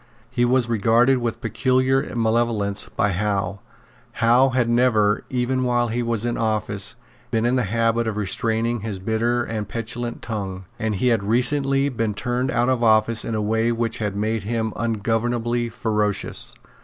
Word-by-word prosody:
He 120 -1 +2
was 125 0 +2
regarded 120 +4 +3
with 120 -2 -3
peculiar 130 +1 +1
malevolence 110 -3 0
by 105 - +2
Howe. 100 0 -1 0.5
Howe 120 +4 +4
had 125 -2 +1
never, 115 -3 +3
even 130 +1 0
while 120 -1 +1
he 120 +2 -1
was 115 -1 -1
in 120 - -1
office, 105 -3 -1 0.3
been 115 0 0
in 120 +2 +2
the 125 -3 +1
habit 115 +1 +1
of 110 -1 -2
restraining 115 +3 0
his 105 -2 -4
bitter 115 +5 0
and 110 -3 -4
petulant 120 +1 -4
tongue; 95 -4 -5
and 110 -1 -1
he 125 +6 +1
had 115 -3 +2
recently 135 +6 +1
been 115 -5 -2
turned 125 +3 -1
out 120 -1 +1
of 130 -2 +1
office 110 0 +3
in 115 - -3
a 105 - -1
way 110 +2 +1
which 115 0 -2
had 105 -2 -2
made 110 +2 -1
him 110 +1 -2
ungovernably 115 +1 -1
ferocious. 105 -2 -2
115 Hz, 165 wpm, -22 LUFS, 110-120 Hz, 0.5 s, Howe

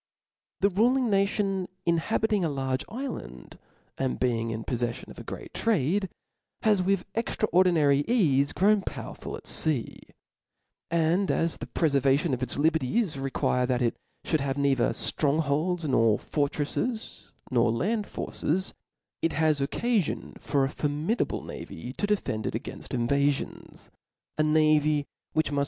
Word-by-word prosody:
The 200 - +5
ruling 240 +5 +3
nation 195 -1 +1 0.2
inhabiting 205 +4 +1
a 165 - +1
large 135 -2 -1
ifland, 220 - -7 0.4
and 130 -1 -1
being 115 -2 0
in 110 0 -4
poflellion 120 -1 -3
of - - -11
a - - -7
great - - -8
trade, 190 - +1 0.5
hath 210 -4 +4
with 190 0 +1
extra 225 -1 -1
ordinary 160 -6 +4
eafe 145 - +2
grown 205 +2 +4
powerful - - -6
at - - -15
fea; 150 -7 0 0.9
and 170 +3 +2
as 165 0 +1
the - - -7
preiervation 140 0 +2
of 125 - -2
its 130 0 -2
liberties 160 - +1
require 130 -2 0
that 125 -1 +1
it 115 - +1 0.3
fhould 155 - +1
have 135 0 -2
neither 135 -4 +2
ftrong 150 0 +1
holds, 160 +3 0
nor 115 -5 +4
fortrelSrs, 150 - -2 0.2
nor 120 -2 +3
land 205 - 0
forces, 185 +5 -2 0.5
it 165 - +1
has 155 -1 +2
occafion 205 - -1
for 140 -2 +1
a - - -2
formidable 150 +11 -1
navy 120 +10 -7
to 205 - -2
de 210 0 +3
fend 110 - -3
it - - -2
againft - - -6
invafions; 140 +4 -1 0.5
a - - +6
navy 155 -1 +3 0.3
which 155 -2 +1
muft. 145 - 0
155 Hz, 145 wpm, -27 LUFS, 135-195 Hz, 0.9 s, a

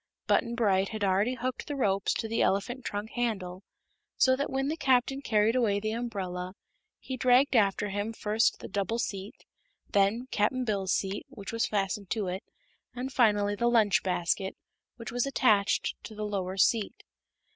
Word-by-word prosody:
Button 235 0 +1
Bright 195 -5 +2
had 215 -2 -4
already 200 +6 +2
hooked 255 +1 -4
the 290 - -3
ropes 200 -7 +1
to 225 - -2
the 225 +1 0
elephant 240 +6 0
trunk 205 +1 -4
handle, 195 -7 -2 0.6
so 260 0 +5
that 280 +2 -2
when 270 +1 -1
the 310 - -1
Captain 265 -1 +2
carried 220 -2 +2
away 215 -5 +2
the 215 +1 -2
umbrella 190 -6 -4 0.4
he 260 - -6
dragged 255 +2 +4
after 205 -1 +2
him 205 +3 -2
first 220 +1 +1
the - - -6
double 200 +3 -2
seat, 200 -3 -5 0.5
then 205 +5 +2
Cap'n 250 +5 +1
Bill's 195 -4 -1
seat, 195 +9 -1
which 210 -8 -8
was 230 - +1
fastened 200 -1 -2
to 215 -4 -1
it, 185 +1 -3 0.5
and 255 +2 -4
finally 205 -4 +3
the 235 +3 +1
lunch 215 -3 +4
basket, 185 +1 -1 0.4
which 230 0 -8
was 245 +2 0
attached 215 -7 +2
to 215 - -9
the 210 0 -4
lower 190 -2 -3
seat. 205 +3 +1
215 Hz, 170 wpm, -29 LUFS, 195-245 Hz, 0.6 s, so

